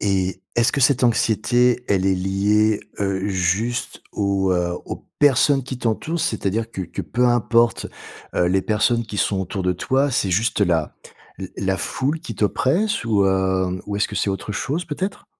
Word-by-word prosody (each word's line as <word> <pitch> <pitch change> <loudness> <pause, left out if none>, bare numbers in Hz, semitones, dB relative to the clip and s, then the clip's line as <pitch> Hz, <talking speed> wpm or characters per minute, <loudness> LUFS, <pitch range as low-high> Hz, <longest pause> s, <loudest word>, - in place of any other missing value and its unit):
Et, 95 -2 -1
est-ce 120 0 +3
que 140 - -1
cette 135 -1 +3
anxiété, 120 +2 +2
elle 95 -2 +2
est 95 - +3
liée, 100 +3 +1 0.2
heu, 95 -1 -1
juste 95 +6 -1
aux, 100 -2 +1
heu, 90 -1 0
aux - - -7
personnes 140 -1 +4
qui 130 0 -6
t'entourent, 125 +8 -2
c'est-à-dire 110 0 -1
que 95 - -6
que 90 - -6
peu 125 +1 +1
importe, 120 -1 +2 0.5
heu, - - +2
les 95 +2 +2
personnes 115 +2 +1
qui 105 - -7
sont 95 0 +1
autour 95 +1 -4
de 90 - +1
toi, 135 +10 0
c'est 100 -6 0
juste 110 +5 +1
la 85 -5 0 0.4
la 95 -1 -6
la 95 -1 0
foule 135 - -2
qui 175 - -7
t'oppresse 135 - 0
ou, 105 -4 +2
heu, 95 -1 +1
ou 100 - -3
est-ce 105 - 0
que 105 - -6
c'est 100 - 0
autre 95 +2 -4
chose 145 - -2
peut-être? 185 +7 -4
105 Hz, 180 wpm, -21 LUFS, 95-120 Hz, 0.5 s, personnes